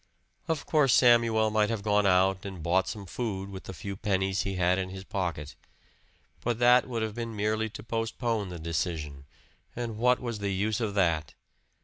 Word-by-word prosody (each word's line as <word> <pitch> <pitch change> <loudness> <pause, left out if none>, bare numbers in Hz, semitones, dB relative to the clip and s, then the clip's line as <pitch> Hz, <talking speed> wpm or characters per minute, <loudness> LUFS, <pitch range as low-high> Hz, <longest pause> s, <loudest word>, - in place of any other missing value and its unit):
Of 160 -3 -2
course 150 -5 +4
Samuel 115 -3 +4
might 105 -1 +2
have 110 -3 -2
gone 105 -1 +3
out 95 0 +3
and 95 -5 -7
bought 90 +3 +2
some 105 -2 -5
food 100 -1 -4
with 95 -1 -8
the - - -7
few 100 +3 -6
pennies 95 -1 0
he 100 -1 -3
had 90 +1 +2
in 95 -1 -3
his 95 0 -8
pocket. 85 -8 -4 0.9
But 120 -2 0
that 125 +1 +5
would 115 -2 -2
have 110 -1 -3
been 115 -1 -5
merely 110 +1 0
to 105 - -9
postpone 115 -2 -2
the 90 - -6
decision, 80 -4 -3 0.5
and 115 -3 -4
what 125 +1 +3
was 120 -4 -4
the 100 -1 -1
use 105 +4 0
of 105 -3 -2
that? 80 -6 +1
100 Hz, 190 wpm, -28 LUFS, 95-115 Hz, 0.9 s, that